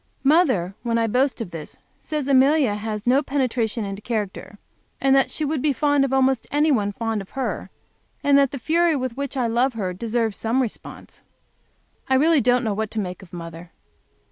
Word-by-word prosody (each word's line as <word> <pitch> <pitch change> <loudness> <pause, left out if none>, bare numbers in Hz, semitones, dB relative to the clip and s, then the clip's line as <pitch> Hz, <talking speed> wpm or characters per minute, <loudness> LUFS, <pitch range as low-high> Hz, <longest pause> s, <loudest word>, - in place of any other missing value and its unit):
Mother, 270 - +3
when 230 -1 0
I 230 - +2
boast 255 +3 +1
of 185 - -5
this, 160 -2 -8 0.2
says 300 -3 -4
she 280 +3 +4
has 210 -1 -3
no 260 +3 +4
penetration 245 -6 -1
into 195 +1 -6
character, 210 -2 -4 0.4
and 270 0 +3
that 270 - +3
she 310 - -2
would 295 -2 -1
be 295 0 +2
fond 290 0 +2
of 275 - -1
almost 265 -2 +2
any 300 +2 +2
one 205 -6 +1
fond 225 0 -3
of 195 - -12
her; 265 - -3 0.5
and 285 -1 +4
that 280 -1 +5
the 275 - -6
fury 330 +5 +2
with 255 -3 -3
which 280 0 -4
I 250 - +1
love 240 +3 +1
her 190 -5 -3
deserves 225 +2 -2
some 230 +3 0
response. 245 -5 -6 0.9
I 265 - +3
really 305 +2 +4
don't 245 +2 +2
know 220 -3 0
what 215 +1 -2
to 220 - -3
make 180 -2 -5
of 190 - -15
mother. 170 0 -9
245 Hz, 195 wpm, -23 LUFS, 210-275 Hz, 0.9 s, that